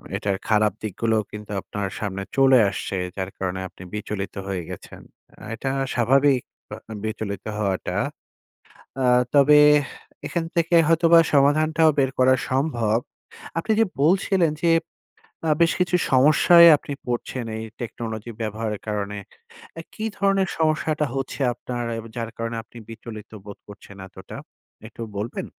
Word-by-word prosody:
এটার 100 -1 -1
খারাপ 105 -2 +3
দিকগুলোও 110 +1 0
কিন্তু 105 0 -9
আপনার 100 0 -4
সামনে 100 -2 -4
চলে 135 -1 +6
আসছে। 95 0 -4 0.2
যার 95 -1 -3
কারণে 95 0 -3
আপনি 90 - -14
বিচলিত 105 -1 -4
হয়ে 95 -2 -2
গেছেন। - - -10 0.4
আ - - -11
এটা 135 +4 -4 0.2
স্বাভাবিক 135 +2 +3 0.3
আ - - -3 0.2
আম 110 - -6
বিচলিত 105 -3 -4
হওয়াটা। 100 -3 -2 1.1
আ - - +2 0.3
তবে 145 +1 +6 0.7
এখান 170 -2 -2
থেকে 170 +1 +2
হয়তোবা 165 0 +5
সমাধানটাও 155 +3 +4
বের 135 -1 +3
করা 130 0 +5 0.2
সম্ভব। 120 -5 +1 0.6
আপনি 220 +7 -1
যে 225 - +5 0.2
বলছিলেন 180 0 +3
যে 165 - +4 0.8
আ - - +2
বেশ 170 - +5
কিছু 180 0 +1 0.2
সমস্যায় 155 +6 +7
আপনি 145 - -7
পড়ছেন 120 0 -3
এই 110 - -5 0.2
টেকনোলজি 115 -1 -5
ব্যবহারের 110 -1 -3
কারণে। 105 -1 -3 0.6
অ্যা 165 - -6
কী 220 - -5
ধরনের 195 -2 +2
সমস্যাটা 155 -1 +1
হচ্ছে 135 +1 -4
আপনার 120 0 -5 0.2
এব 115 - -9
যার 115 -1 -3
কারণে 115 0 -3
আপনি 120 - -16
বিচলিত 110 -2 -10
বোধ 100 - -9
করছেন 100 -1 -13
এতটা, 95 0 -11 0.5
একটু 115 - -12 0.2
বলবেন? 105 +4 -4
120 Hz, 140 wpm, -23 LUFS, 105-155 Hz, 1.1 s, সমস্যায়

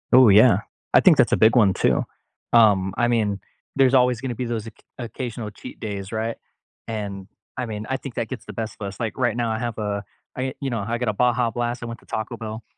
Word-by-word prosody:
Ooh 130 -3 +8
yeah. 110 +5 +6 0.3
I - - +8
think - - +6
that's - - +4
a - - +3
big 110 +2 +5
one 105 -6 +5
too, - - +2 0.5
um, 100 -5 +4
I 120 - +3
mean, 105 -4 +1 0.4
there's 135 -1 +4
always 125 -2 +3
gonna 130 -2 -3
be 125 - -3
those 115 -2 -3
occ 115 - -12 0.2
occasional 120 -2 -5
cheat 125 - -11
days, 100 -3 -5
right, 115 +1 -2 0.5
and 100 -4 -5 0.3
I 130 - -2
mean, 105 -1 -5
I 130 - 0
think 135 -4 -9
that 115 - -2
gets 130 - -7
the - - -8
best 110 -2 -5
of 100 - -4
us. 100 - -9
Like, 115 -2 -3
right 120 -3 +1
now 120 -2 0
I 110 - -2
have 120 -1 -4
a 105 -1 -2 0.3
I 130 0 -2
you 135 - -1
know, 115 - -1
I 120 +1 -1
got 120 -2 -1
a - - 0
Baja 120 +1 +2
Blast; 120 +1 -3
I - - -3
went 115 0 -7
to - - -23
Taco 110 +2 -4
Bell. 110 0 -6
115 Hz, 245 wpm, -23 LUFS, 105-120 Hz, 0.5 s, Ooh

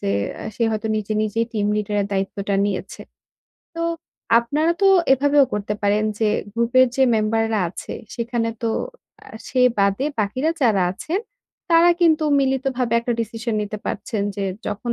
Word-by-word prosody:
যে, 100 - -1 0.3
এ - - -5
সে 235 - -2
হয়তো 220 0 -2
নিজে, 215 0 -3
নিজেই 215 +2 0
team 210 -2 0
leader 210 0 -2
এর 200 - -1
দায়িত্বটা 195 +1 -2
নিয়েছে। 200 -1 -4 0.7
তো 335 - -3 0.6
আপনারা 295 +8 +1
তো - - +6 0.3
এভাবেও 285 +1 +4
করতে 210 0 -2
পারেন 205 +1 +2
যে 220 - +2 0.2
গ্রূপের 235 +3 +4
যে 270 - +3
মেম্বাররা 225 0 +1
আছে, 180 - -8 0.2
সেখানে 235 -1 -2
তো 230 - +1 0.6
আ - - -15 0.2
সে 255 - 0 0.2
বাদে 200 +5 +2
বাকিরা 255 +9 0
যারা 210 -6 +3
আছেন 325 - -3 0.5
তারা 335 +1 +6
কিন্তু 320 -2 +4 0.2
মিলিতভাবে 265 -3 0
একটা 240 +1 -1
decision 225 +1 -3
নিতে 210 +1 -5
পারছেন 215 -4 -3
যে, 200 - -2 0.2
যখন 235 +4 -3
225 Hz, 155 wpm, -21 LUFS, 210-260 Hz, 0.7 s, তো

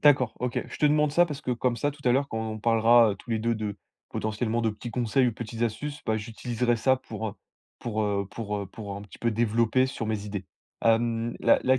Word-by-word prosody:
D'accord, 135 -5 +5
OK. 125 -1 0
Je - - -8
te 150 - +4
demande 150 0 +3
ça 175 +2 +5
parce 150 -3 -5
que, 130 - -2
comme 125 0 +1
ça, 145 +4 0
tout 145 +1 -14
à 120 - +5
l'heure 140 +2 +2
quand 110 - -3
on 110 - -5
parlera 115 0 +5
tous 120 - -11
les 115 - +1
2 115 +2 +1
de, 105 -2 -3 0.3
potentiellement 110 +2 -1
de 110 - +2
petits 110 +3 -7
conseils 125 +2 +2
ou - - -2
petites 115 +1 -5
astuces, 145 +6 -2
bah 110 -1 +1
j'utiliserai 120 +2 -1
ça 130 +4 +3
pour, 110 -4 -5
heu, - - -6 0.5
pour, 110 -2 -2
heu, 100 -1 0
pour, 105 -1 -3
heu, 100 - -3
pour 100 0 -7
un 100 - -7
petit 105 - -13
peu 120 - +1
développer 115 +3 +2
sur 115 -4 -4
mes 110 -2 -2
idées. 100 -2 -4 0.4
Hem, 115 0 +2
la - - +5
la 130 0 +4
115 Hz, 240 wpm, -27 LUFS, 110-125 Hz, 0.5 s, D'accord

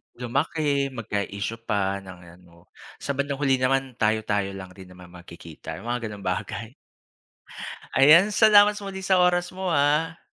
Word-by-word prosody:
Lumaki, 140 +2 -1
magka-isyu 105 -1 -4
pa 100 -1 0
ng 95 -2 -12 0.2
ano. 85 -1 -22 0.3
Sa 140 -1 -3
bandang 140 0 -2
huli 135 -2 +3
naman 130 -1 -1
tayo-tayo 105 -3 0
lang 95 -1 -9
rin 95 - -11
naman 90 -1 -15
magkikita, 85 -2 -11
'yong 120 - -7
mga 120 -1 -2
ganong 105 -3 -8
bagay. 110 +4 -7 1.2
Ayan, 165 +10 +6
salamat 210 -1 +5
muli 195 -1 -7
sa 190 -1 +3
oras 180 0 +2
mo, 190 0 -5
ah. 160 +1 +1
125 Hz, 145 wpm, -24 LUFS, 100-160 Hz, 1.2 s, Ayan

